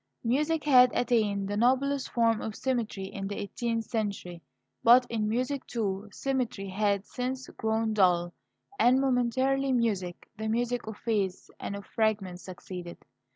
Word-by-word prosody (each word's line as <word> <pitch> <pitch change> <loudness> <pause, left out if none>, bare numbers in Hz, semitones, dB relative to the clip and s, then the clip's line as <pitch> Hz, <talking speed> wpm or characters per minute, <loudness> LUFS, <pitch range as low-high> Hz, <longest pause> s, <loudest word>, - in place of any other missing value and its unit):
Music 300 +7 +1
had 255 -4 +7
attained 210 -5 +1
the 205 - -2
noblest 265 +4 +2
form 230 -2 +2
of 215 - -4
symmetry 235 -7 -2
in 195 0 -5
the 200 - -4
eighteenth 230 +2 -2
century, 200 -7 -3 0.4
but 245 +2 +7
in 215 -2 0
music, 255 +4 -1
too, 210 -3 -2
symmetry 250 -7 -2
had 200 0 0
since 255 +1 -4
grown 220 0 -1
dull; 175 -4 +3 0.5
and 250 +2 +5
momentary 265 +1 +1
music, 205 -8 -1
the 220 - -2
music 240 +1 -1
of 220 -1 -6
phase 200 -5 -2
and 200 - -4
of 200 0 -8
fragment, 205 -5 -1
succeeded. 180 -1 -8
225 Hz, 145 wpm, -29 LUFS, 200-250 Hz, 0.5 s, had